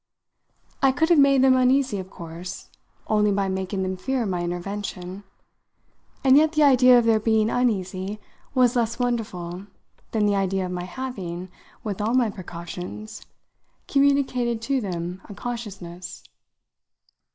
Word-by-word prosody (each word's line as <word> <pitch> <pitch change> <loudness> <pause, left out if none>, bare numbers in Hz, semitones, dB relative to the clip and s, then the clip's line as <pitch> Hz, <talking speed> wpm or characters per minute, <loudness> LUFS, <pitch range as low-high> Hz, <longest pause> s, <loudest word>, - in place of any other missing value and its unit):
I 270 - +5
could 320 +6 +1
have 340 -4 +6
made 275 -1 +5
them 260 -1 +6
uneasy, 255 -3 +2
of 185 0 -7
course, 170 0 -8 0.4
only 210 -1 +2
by 200 -1 +1
making 190 +1 -2
them 185 0 -2
fear 260 +4 -1
my 180 -3 -1
intervention; 185 +1 -5 1.0
and 265 -1 +6
yet 310 +2 +5
the 305 -1 +4
idea 255 -3 +7
of 240 - +3
their 225 -1 +4
being 220 0 +2
uneasy 200 -4 -1 0.4
was 250 -1 +4
less 230 -1 0
wonderful 205 -7 -3 0.4
than 215 -2 +1
the 205 -1 +2
idea 195 -1 0
of 180 - -5
my 180 -1 -4
having, 185 -6 -6 0.3
with 210 -2 -3
all 225 +4 +1
my 240 -4 +3
precautions, 180 +3 -8 0.6
communicated 275 -4 +2
to 270 +1 0
them 180 -2 -4
a 205 - -8
consciousness. 195 -8 -7
210 Hz, 140 wpm, -24 LUFS, 185-250 Hz, 1.0 s, idea